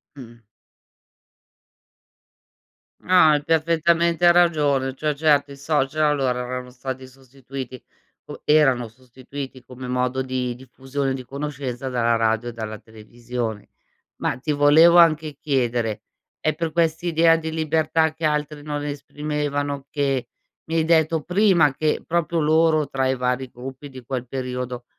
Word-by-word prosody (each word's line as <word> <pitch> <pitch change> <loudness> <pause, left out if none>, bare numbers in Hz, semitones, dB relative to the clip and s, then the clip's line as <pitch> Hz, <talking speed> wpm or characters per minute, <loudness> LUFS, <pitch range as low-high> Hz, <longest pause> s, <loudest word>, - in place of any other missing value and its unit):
Mh-mh. 120 -4 -12 2.6
No, 185 - -3 0.2
hai 150 -1 +2
perfettamente 170 +2 +3
ragione. 145 -6 +2
Cioè, 150 +2 -1
certo 145 -1 +2
i - - -9
social 150 +1 0
allora 135 -4 +1
erano 125 0 -6
stati 130 +1 -6
sostituiti, 130 -1 -9 0.4
u - - -9
erano 135 -6 +3
sostituiti 130 +2 -10
come 125 0 -9
modo 125 +1 -1
di 125 -1 -3
diffusione, 135 +2 -4
di 130 -1 -6
conoscenza 135 -2 -5
dalla 120 -2 +1
radio, 115 +1 0
dalla 110 -2 -6
televisione. 110 0 -6 0.5
Ma - - -2
ti 150 +4 -2
volevo 150 +4 +6
anche 155 -3 +4
chiedere, 120 -6 -1 0.4
è 155 - 0
per 165 -2 -3
quest'idea 165 0 +2
di 160 0 -4
libertà 160 0 +1
che 160 0 -4
altri 150 -1 -1
non 145 -1 -4
esprimevano, 145 -1 -3
che 135 -4 -1 0.4
mi 165 +1 -3
hai 160 - +3
detto 160 -1 +2
prima 180 -5 +3
che, 155 +1 -1
proprio 170 0 0
loro 155 -1 +3
tra 135 -1 0
i 130 - +1
vari 125 +1 -1
gruppi 130 +3 -9
di 130 -2 -11
quel 125 0 -4
periodo, 125 -1 -5
140 Hz, 130 wpm, -22 LUFS, 125-155 Hz, 2.6 s, volevo